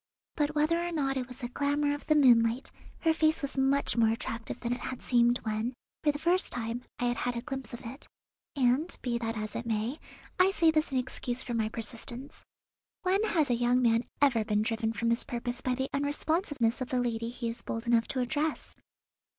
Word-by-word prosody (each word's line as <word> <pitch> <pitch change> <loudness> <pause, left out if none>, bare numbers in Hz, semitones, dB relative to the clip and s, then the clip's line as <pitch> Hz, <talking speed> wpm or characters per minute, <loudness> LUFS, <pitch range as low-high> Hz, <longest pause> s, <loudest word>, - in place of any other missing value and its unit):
But, 300 -1 0
whether 310 +3 +3
or 345 0 -2
not 275 -4 0
it 255 -2 -2
was 250 -1 -9
the 250 -3 -4
glamour 285 +3 0
of 290 - -7
the 305 - +4
moonlight, 240 -3 +4 0.3
her 325 -1 +3
face 315 -1 +2
was 280 - -2
much 270 +1 +2
more 230 -2 +4
attractive 230 0 -4
than 240 0 0
it 245 - -4
had 255 0 -5
seemed 240 0 +3
when, 220 +3 -2 0.3
for 300 - +4
the 290 - -5
first 350 +4 +2
time, 235 0 -3 0.2
I - - -3
had 240 0 0
had 245 -1 -1
a - - -2
glimpse 270 -1 -5
of 240 - -8
it, 250 +5 -6 0.5
and, 270 +5 +2
be 235 -2 0
that 225 -1 -3
as 215 0 -4
it 235 - -4
may, 225 +6 -1 0.4
I 365 +1 +6
say 330 -3 +4
this 310 -1 +1
in 265 - 0
excuse 250 0 -2
for 240 - -4
my 220 -2 0
persistence. 235 +4 -7 0.6
When 375 +2 +2
has 315 - +2
a - - +4
young 240 +1 +3
man 230 0 +3 0.2
ever 240 -6 +4
been 210 -1 +1
driven 225 -1 0
from 230 +1 0
his 235 - +2
purpose 245 +1 -3
by 255 -1 0
the 265 +1 -1
unresponsiveness 285 - 0
of 250 - -3
the 255 - +1
lady 230 -1 -1
he 240 -1 -4
is 230 - -6
bold 225 +1 -4
enough 235 -1 +3
to 260 - 0
address? 300 +5 -1
250 Hz, 215 wpm, -30 LUFS, 235-290 Hz, 0.6 s, I